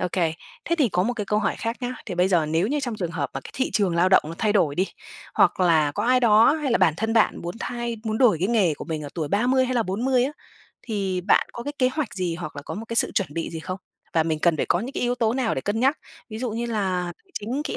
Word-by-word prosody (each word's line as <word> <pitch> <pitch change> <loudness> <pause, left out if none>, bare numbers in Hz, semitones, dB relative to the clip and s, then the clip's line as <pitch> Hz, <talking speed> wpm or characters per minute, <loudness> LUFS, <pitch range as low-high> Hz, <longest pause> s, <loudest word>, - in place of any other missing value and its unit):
OK. 180 - -1 0.5
Thế 340 - 0
thì 275 - +4
có 180 -3 +1
một 240 +6 0
cái 210 -4 -4
câu 210 - +1
hỏi 210 - 0
khác 230 +1 -2
nhá, 250 0 -3
thì 185 - -4
bây 180 +2 +2
giờ 170 -5 +2
nếu 160 +4 +1
như 290 +5 0
trong 245 -5 -3
trường 175 -5 -3
hợp 155 -4 -3
mà 135 - -3
cái - - -11
thị 265 - -1
trường 195 -5 +1
lao 175 +2 +4
động 190 - +6
nó 165 - -6
thay 215 -2 +2
đổi 175 -9 +2
đi, 185 +5 +1 0.5
hoặc - - +3
là 160 -5 +3
có - - -2
ai 255 +1 +4
đó 225 +2 +6
hay 300 -4 -2
là - - +3
bản 160 - +4
thân 225 +3 -1
bạn 225 -2 +3
muốn 175 +1 -5
thay 240 -1 -3
muốn 220 0 -1
đổi 245 -9 +5
cái 185 +5 0
nghề 200 -9 +3
của - - -8
mình 160 -2 -4
ở 145 - -6
tuổi 155 -4 -2
30 250 - +2
hay 255 0 -2
là 240 - +2
40 245 +6 +1
á, 280 - -2 0.5
thì 195 -5 -2
bạn 190 - +3
có 235 - -6
cái 290 - -4
kế 255 - +4
hoạch 275 -2 -3
gì 180 -3 -2
hoặc 175 -3 -7
là 145 - -6
có - - -6
một 225 - -6
cái 230 - -3
sự - - +2
chuẩn 195 - 0
bị 165 - -3
gì 165 - -6
không? 185 +3 -5 0.3
Và 165 - +3
mình 160 -1 -1
cần 165 0 +3
phải - - -1
có 175 - +2
những 255 +6 -5
cái - - -3
yếu 245 0 +1
tố 230 -3 +1
nào 250 -3 0
để - - -2
cân 205 +9 -2
nhắc, 270 +5 +3 0.3
ví 220 - -5
dụ 250 0 -2
như 230 +2 -3
là 185 -6 -1
tài 385 - -30
chính, 245 +8 -3
kỹ 305 - -3
210 Hz, 305 wpm, -24 LUFS, 175-245 Hz, 0.5 s, động